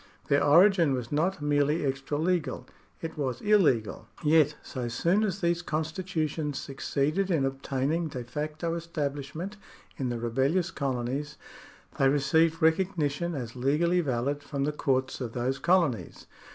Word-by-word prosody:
Their 140 0 +4
origin 170 0 +5
was 120 -2 -5
not 160 +2 0
merely 145 +1 +2
extra 135 +2 -2
legal; 155 -6 -1 0.4
it 160 -1 -5
was 130 -4 -2
illegal. 170 - +2 0.2
Yet 150 -1 +4
so 125 -3 -4
soon 170 - +1
as 195 -2 -2
these 170 0 +1
constitutions 160 -2 -2
succeeded 150 +7 -1
in 160 -7 +2
obtaining 135 +4 -1
de 130 -5 -6
facto 150 +6 -3
establishment 160 +3 -4 0.4
in 130 -2 -2
the 120 - -2
rebellious 135 +10 0
colonies, 135 +2 -3 0.6
they 135 - +5
received 160 +4 +2
recognition 165 -2 +1
as 120 -4 -5
legally 150 +8 +2
valid 140 0 -1
from 140 -1 -3
the 150 - +1
courts 130 -3 -1
of 120 -3 -4
those 130 +3 -1
colonies. 170 - +1
150 Hz, 140 wpm, -28 LUFS, 135-170 Hz, 0.6 s, origin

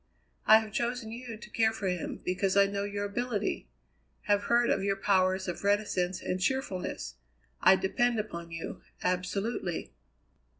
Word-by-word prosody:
I 220 - +10
have 215 -1 -8
chosen 240 -1 -2
you 235 -1 -7
to 215 -1 -12
care 220 -1 +3
for 215 -3 -4
him, 180 -2 -3
because 185 +2 +1
I 200 - +7
know 200 0 -2
your 205 0 -3
ability; 215 0 -2 0.6
have 205 0 +2
heard 240 0 +3
of 195 - +1
your 195 0 +1
powers 190 -1 +2
of 180 - -4
reticence 190 -3 +1
and 185 0 -2
cheerfulness. 195 - -2 0.4
I 190 - +7
depend 230 +6 +1
upon 170 -5 -5
you 165 0 -6 0.2
absolutely." 180 +1 -2
200 Hz, 155 wpm, -30 LUFS, 185-220 Hz, 0.6 s, I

